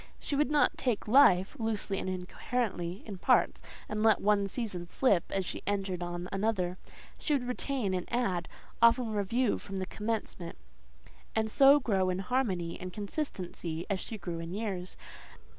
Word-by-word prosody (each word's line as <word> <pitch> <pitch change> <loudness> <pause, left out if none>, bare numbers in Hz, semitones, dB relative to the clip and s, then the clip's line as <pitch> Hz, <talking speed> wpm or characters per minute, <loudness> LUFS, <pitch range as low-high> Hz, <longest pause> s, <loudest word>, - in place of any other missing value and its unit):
She 290 - -2
would 295 0 +2
not 300 -1 +3
take 240 -6 -1
life, 210 -5 +5
loosely 215 -3 -1
and - - -3
incoherently, 185 0 -3
in 200 -4 -7
parts, - - +3 0.3
and 215 0 -2
let 220 -1 +5
one 205 -1 +2
season 195 -5 -3
slip 195 -3 +2
as 195 -1 -1
she - - -5
entered 195 -3 -1
on 175 0 -4
another: 195 -3 -1 0.4
she 300 - 0
would 255 -4 0
retain 250 -5 -1
and 180 -1 -3
add; 195 -8 0 0.3
often 235 0 +5
review 215 +4 +1
from 195 - -8
the 190 - -2
commencement, 210 -4 -4 0.8
and 220 0 +1
so 280 +3 +7
grow 195 -8 +1
in 180 - 0
harmony 190 -6 -1
and 185 0 -5
consistency 180 - -4
as 195 - 0
she 220 - -6
grew 175 -3 -5
in 165 +2 -5
years. 195 -4 -4
200 Hz, 160 wpm, -31 LUFS, 180-235 Hz, 0.8 s, so